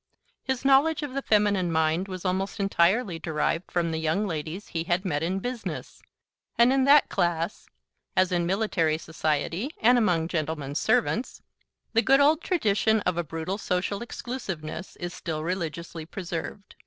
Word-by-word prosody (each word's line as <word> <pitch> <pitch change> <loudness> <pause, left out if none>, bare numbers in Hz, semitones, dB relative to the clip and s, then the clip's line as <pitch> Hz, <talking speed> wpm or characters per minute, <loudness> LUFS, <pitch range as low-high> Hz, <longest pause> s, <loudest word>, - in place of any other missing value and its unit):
His 265 0 -3
knowledge 290 +3 +4
of 285 -3 -5
the 275 - -1
feminine 205 -6 +2
mind 160 +3 +1
was 185 -1 -7
almost 190 +3 -1
entirely 195 0 +2
derived 165 +2 -1
from 170 -2 0
the 160 - -2
young 160 +6 0
ladies 165 +2 -5
he 165 -1 -3
had 175 +3 0
met 150 -5 -1
in 180 +4 -1
business, 245 +3 -5 0.6
and 240 +2 +5
in 270 -1 +3
that 285 +1 +6
class 170 +3 -1 0.5
(as 185 0 +4
in 175 -1 +1
military 180 -5 +1
society 160 - -2
and 245 +2 +5
among 175 -7 +2
gentlemen's 155 -4 -2
servants) 235 +1 0 0.5
the 230 - +4
good 270 +3 +4
old 300 +3 +4
tradition 220 - +2
of 180 - 0
a 175 - -1
brutal 165 +5 -4
social 195 +2 -1
exclusiveness 190 -9 -6
is 175 0 -5
still 155 -3 -4
religiously 170 -2 -4
preserved. 180 +2 -6
185 Hz, 155 wpm, -26 LUFS, 165-220 Hz, 0.6 s, that